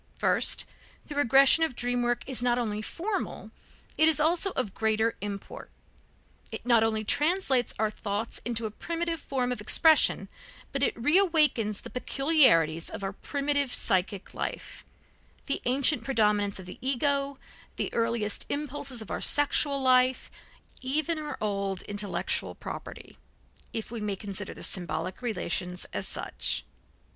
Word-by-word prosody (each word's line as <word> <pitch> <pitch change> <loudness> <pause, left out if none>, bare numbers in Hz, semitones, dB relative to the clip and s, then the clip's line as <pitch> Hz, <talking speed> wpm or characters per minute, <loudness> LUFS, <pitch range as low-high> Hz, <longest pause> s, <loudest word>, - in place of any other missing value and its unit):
First: - - 0 0.4
the 295 - -7
regression 275 +3 +5
of 320 -6 -1
dream 245 0 -1
work 240 0 0
is 260 -2 +2
not 245 -1 +2
only 215 -3 -2
formal, 385 - -4 0.5
it 315 - +7
is 320 -1 +5
also 335 +5 +2
of 220 -7 -2
greater 220 +1 +1
import. 200 -1 -7 0.8
It - - -7
not 235 -2 +4
only 220 -1 0
translates 295 - +2
our 215 0 0
thoughts 210 +2 -4
into 230 -1 -2
a 215 - -3
primitive 335 +6 -3
form 255 -3 -2
of 245 - -3
expression, 315 +9 +4 0.4
but 275 - -2
it 280 - +2
reawakens 300 - +2
the - - -9
peculiarities 250 - +3
of - - -7
our 195 0 -3
primitive 285 +3 -1
psychic 190 -1 0
life, - - -5 0.6
the 275 - -2
ancient 265 0 +3
predominance 210 -5 +1
of 190 - -8
the 180 - -10
ego, 275 +1 0 0.4
the - - -3
earliest 230 -2 -1
impulses 280 -5 -2
of - - -11
our - - -3
sexual 290 -1 +2
life, 255 -1 +3 0.5
even 310 +5 -1
our 300 -1 -5
old 200 -3 -2
intellectual 205 0 -2
property, - - -9 0.5
if 225 0 -5
we 235 -2 -5
may 205 -1 -2
consider 200 0 -4
the - - -9
symbolic 170 +1 -4
relations 180 -6 -3
as - - -1
such. - - -2
245 Hz, 145 wpm, -28 LUFS, 210-285 Hz, 0.8 s, it